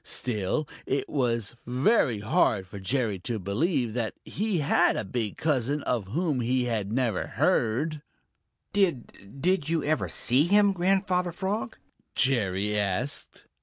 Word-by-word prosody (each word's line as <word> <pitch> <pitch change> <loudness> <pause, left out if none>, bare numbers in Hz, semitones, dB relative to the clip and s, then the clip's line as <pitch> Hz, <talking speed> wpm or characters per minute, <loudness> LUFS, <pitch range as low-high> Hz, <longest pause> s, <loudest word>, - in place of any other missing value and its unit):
Still, 120 +5 -2 0.2
it 135 - -1
was 120 -6 -1
very 125 - +2
hard 105 -2 +2
for 100 +2 -9
Jerry 110 -1 -1
to 115 +5 -3
believe 115 - 0
that 115 -2 -2
he 210 -2 -1
had 145 -3 +3
a - - -2
big 110 +1 -3
cousin 145 -1 0
of 115 -6 -1
whom 150 - -1
he 125 +2 +1
had 110 -4 -2
never 120 -5 0
heard. 145 +7 +1 0.7
"Did 140 - -1
did 175 -1 +1
you 165 -2 +1
ever 155 +1 0
see 130 +5 +3
him, 200 +2 +4
Grandfather 185 -1 +1
Frog?" 200 +7 -3 0.4
Jerry 105 -6 +1
asked. 105 +6 -2
130 Hz, 135 wpm, -27 LUFS, 110-165 Hz, 0.7 s, him